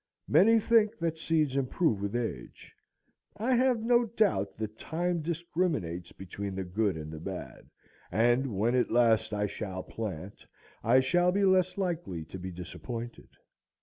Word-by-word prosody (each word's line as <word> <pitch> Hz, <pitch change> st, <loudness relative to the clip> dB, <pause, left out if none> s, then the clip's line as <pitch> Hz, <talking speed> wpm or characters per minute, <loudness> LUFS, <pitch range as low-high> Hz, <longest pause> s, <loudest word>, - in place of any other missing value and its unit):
Many 225 Hz, +3 st, +6 dB
think 225 Hz, 0 st, +3 dB
that 165 Hz, -1 st, -2 dB
seeds 155 Hz, -4 st, +1 dB
improve 135 Hz, -, +1 dB
with 100 Hz, +2 st, -3 dB
age. 110 Hz, -, -5 dB, 0.6 s
I 240 Hz, +5 st, +1 dB
have 250 Hz, -2 st, +3 dB
no 240 Hz, +1 st, +4 dB
doubt 205 Hz, -, 0 dB
that 110 Hz, 0 st, -5 dB
time 175 Hz, +1 st, -1 dB
discriminates 155 Hz, -, -2 dB
between 95 Hz, +1 st, -6 dB
the 95 Hz, -, -2 dB
good 95 Hz, 0 st, 0 dB
and 75 Hz, 0 st, -7 dB
the 80 Hz, -, -7 dB
bad; 90 Hz, +3 st, -7 dB, 0.4 s
and 120 Hz, +3 st, +2 dB
when 115 Hz, +4 st, +2 dB
at 125 Hz, -1 st, +2 dB
last 115 Hz, -2 st, +3 dB
I 105 Hz, 0 st, 0 dB
shall 95 Hz, -2 st, -5 dB
plant, 100 Hz, -4 st, -6 dB, 0.4 s
I 125 Hz, +4 st, +5 dB
shall 175 Hz, +7 st, +3 dB
be 200 Hz, +2 st, +2 dB
less 185 Hz, -1 st, +3 dB
likely 170 Hz, -, -3 dB
to 95 Hz, +4 st, -9 dB
be 95 Hz, +1 st, -5 dB
disappointed. 115 Hz, +7 st, -7 dB
120 Hz, 150 wpm, -30 LUFS, -, 0.6 s, Many